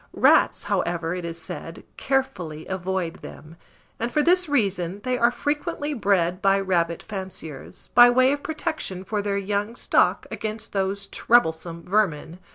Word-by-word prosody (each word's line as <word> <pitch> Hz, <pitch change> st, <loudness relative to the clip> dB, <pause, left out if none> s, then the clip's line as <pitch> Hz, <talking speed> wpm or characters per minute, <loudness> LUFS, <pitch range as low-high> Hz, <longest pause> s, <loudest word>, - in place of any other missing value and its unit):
Rats, -, -, +4 dB
however, 170 Hz, -1 st, -1 dB
it 180 Hz, -1 st, -4 dB
is 165 Hz, 0 st, -6 dB
said, -, -, -8 dB
carefully 180 Hz, -, -2 dB
avoid 190 Hz, -2 st, -3 dB
them; 155 Hz, +2 st, -11 dB, 0.4 s
and 235 Hz, +1 st, -2 dB
for 300 Hz, +4 st, +2 dB
this 360 Hz, 0 st, +3 dB
reason 195 Hz, -8 st, 0 dB
they 255 Hz, 0 st, 0 dB
are 235 Hz, -1 st, +4 dB
frequently 295 Hz, +3 st, -2 dB
bred 195 Hz, -6 st, +1 dB
by 195 Hz, 0 st, +3 dB
rabbit 170 Hz, -3 st, 0 dB
fanciers, 190 Hz, -8 st, -8 dB
by 245 Hz, 0 st, +9 dB
way 255 Hz, +2 st, +4 dB
of 285 Hz, 0 st, -2 dB
protection 310 Hz, -, -4 dB
for 210 Hz, +1 st, -2 dB
their 200 Hz, -1 st, -1 dB
young 205 Hz, +3 st, -2 dB
stock -, -, +2 dB
against 220 Hz, +1 st, -5 dB
those 195 Hz, 0 st, -1 dB
troublesome 170 Hz, -9 st, +1 dB
vermin. 180 Hz, -4 st, 0 dB
195 Hz, 150 wpm, -24 LUFS, 175-240 Hz, 0.4 s, by